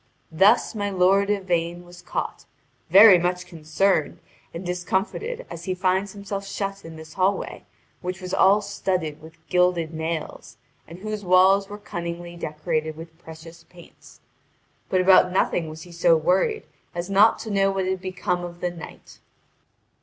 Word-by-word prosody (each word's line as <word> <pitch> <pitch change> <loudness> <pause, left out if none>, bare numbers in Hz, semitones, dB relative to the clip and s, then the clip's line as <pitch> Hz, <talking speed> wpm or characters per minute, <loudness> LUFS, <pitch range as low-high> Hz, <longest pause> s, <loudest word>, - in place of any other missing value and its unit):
Thus 200 +11 +4
my 205 -2 -2
lord 195 +1 +3
Yvain 175 -3 -1
was 175 0 -14
caught, - - -5 0.4
very 195 +1 +8
much 180 +1 -1
concerned 165 0 0 0.3
and 170 +3 -8
discomfited 190 - -3
as 170 - -9
he 185 - -2
finds 190 +1 0
himself 200 -1 -6
shut 195 0 -4
in 165 0 -10
this 160 0 -12
hallway, 190 +1 -1 0.4
which 185 +1 -5
was 185 -1 -7
all 200 +2 +4
studded 180 -6 -3
with 160 +1 -14
gilded 180 -3 +1
nails, 160 -7 -5 0.3
and 165 - -11
whose 215 +2 -5
walls 190 +2 +4
were 205 - -7
cunningly 175 -3 -6
decorated 155 -1 -3
with 165 0 -12
precious 165 0 -13
paints. 175 -1 -18 0.7
But 185 - +2
about 185 -1 +5
nothing 175 -3 0
was 155 0 -9
he 175 - -14
so 170 -1 +3
worried 190 - +1 0.3
as 175 0 -3
not 200 +3 +5
to 220 - -6
know 195 -1 +2
what 195 -1 -1
had 190 0 -2
become 185 -1 -2
of 175 0 -8
the 180 0 -2
knight. 170 -2 -12
180 Hz, 155 wpm, -24 LUFS, 170-195 Hz, 0.7 s, very